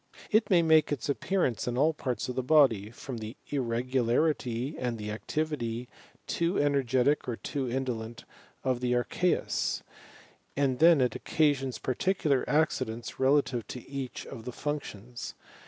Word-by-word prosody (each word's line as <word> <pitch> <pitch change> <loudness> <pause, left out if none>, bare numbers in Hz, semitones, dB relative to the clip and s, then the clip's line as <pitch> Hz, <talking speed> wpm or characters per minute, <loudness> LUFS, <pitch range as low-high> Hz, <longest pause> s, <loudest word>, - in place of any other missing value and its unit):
It 215 +1 +3
may 175 -4 +5
make 160 -2 +5
its 145 0 -1
ap - - -4
pearance 160 - 0
in 120 0 -1
all 155 +4 +4
parts 125 -6 -3
of 125 - -3
the 130 - -1
body, 125 -7 +4
from 120 +1 -7
the 110 +3 -7
irregularity 125 +1 0
and 120 -2 -2
the 105 -1 -5
activity, 120 -1 -3 0.4
too 170 +3 0
energetic 140 -1 +2
or 120 - -1
too 130 +2 -3
indolent, 120 -3 -3 0.4
of 130 -2 +1
the 125 0 0
aicheus; 145 +9 0 0.7
and 135 -3 +1
then 165 -2 +7
it 125 - +1
occasions 140 -4 +1
particular 140 0 +1
accidents 120 -7 0
re 130 0 +4
lative 135 -5 +2
to 125 - -8
each 135 -2 -5
of 120 -4 -9
the 125 - -4
functions. 125 -6 -5
130 Hz, 150 wpm, -29 LUFS, 120-150 Hz, 0.7 s, then